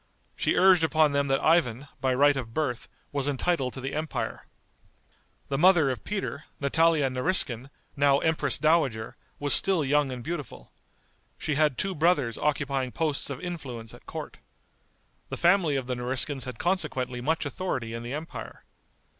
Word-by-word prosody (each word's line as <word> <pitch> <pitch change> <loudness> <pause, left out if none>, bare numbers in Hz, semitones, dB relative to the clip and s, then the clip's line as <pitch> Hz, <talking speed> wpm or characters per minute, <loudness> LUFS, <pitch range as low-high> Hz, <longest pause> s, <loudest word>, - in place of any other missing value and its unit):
She - - +1
urged 185 -2 +5
upon 155 -2 +3
them 140 0 +1
that 135 0 +1
Ivan, 150 -5 +2
by 130 -1 +1
right 145 +2 +5
of 115 -4 -6
birth, 140 -7 -2 0.2
was 140 -1 -2
entitled 140 -1 0
to 130 - -6
the 135 +2 -4
empire. 155 +1 -4 1.0
The 135 -1 -1
mother 170 -5 +5
of 125 - -6
Peter, 195 -7 -4
Natalia 155 +1 +3
Nariskin, 130 -2 +1 0.3
now 140 -1 +4
empress 160 +2 +1
dowager, 150 -9 +1 0.2
was 145 -1 +2
still 185 -6 +3
young 145 0 +2
and 125 -1 -6
beautiful. 145 - -6 0.7
She 155 - -2
had 150 -2 +2
two 195 0 -1
brothers 155 -7 +1
occupying 140 -3 -1
posts 155 -2 -2
of 140 0 -6
influence 135 -11 -6
at - - -16
court. - - -7 0.9
The - - -5
family 175 -4 +3
of 135 -2 -2
the 125 - -2
Nariskins 130 +3 0
had 125 -3 -7
consequently 135 -8 -1
much 160 +4 0
authority 135 -6 -3
in 115 - -5
the 120 +2 -6
empire. 155 +2 -8
145 Hz, 160 wpm, -27 LUFS, 130-160 Hz, 1.0 s, urged